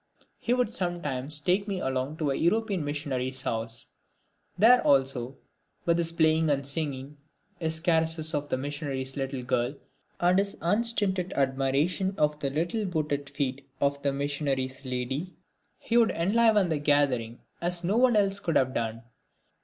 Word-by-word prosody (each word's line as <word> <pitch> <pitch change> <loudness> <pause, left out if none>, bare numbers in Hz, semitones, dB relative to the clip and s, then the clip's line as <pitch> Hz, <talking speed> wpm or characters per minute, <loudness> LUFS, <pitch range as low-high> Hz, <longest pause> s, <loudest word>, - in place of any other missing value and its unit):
He 245 - +1
would 250 -3 0
sometimes 155 - -1
take 185 +6 +1
me 195 -2 -2
along 130 +1 -2
to 150 -4 0
a - - 0
European 200 0 +1
missionary's 130 -3 -3
house. 115 +1 -3 0.7
There, 240 +6 +6
also, 135 -2 +1 0.5
with 170 0 +2
his 165 -1 +2
playing 160 -1 +3
and 140 -1 0
singing, 140 -1 -1 0.4
his 160 -1 0
caresses 160 -1 +1
of 145 -1 -2
the - - 0
missionary's 135 -1 -3
little 135 -2 -3
girl 125 +1 0 0.4
and 180 +2 +4
his 200 0 -2
unstinted 195 -1 +1
admiration 140 +8 0
of 150 0 +1
the 140 - -1
little 175 +9 -1
booted 150 -5 -2
feet 140 -1 -3
of 140 0 0
the 140 - +1
missionary's 140 -2 -2
lady, 130 +7 -3 0.4
he 235 - 0
would 230 -2 +5
enliven 210 +2 +3
the 155 -2 0
gathering 135 -6 +1 0.2
as 175 0 0
no 190 +5 +1
one 245 -1 +4
else 200 -1 +2
could 170 -4 -2
have 130 0 +2
done. 115 0 -3
150 Hz, 155 wpm, -28 LUFS, 135-180 Hz, 0.7 s, There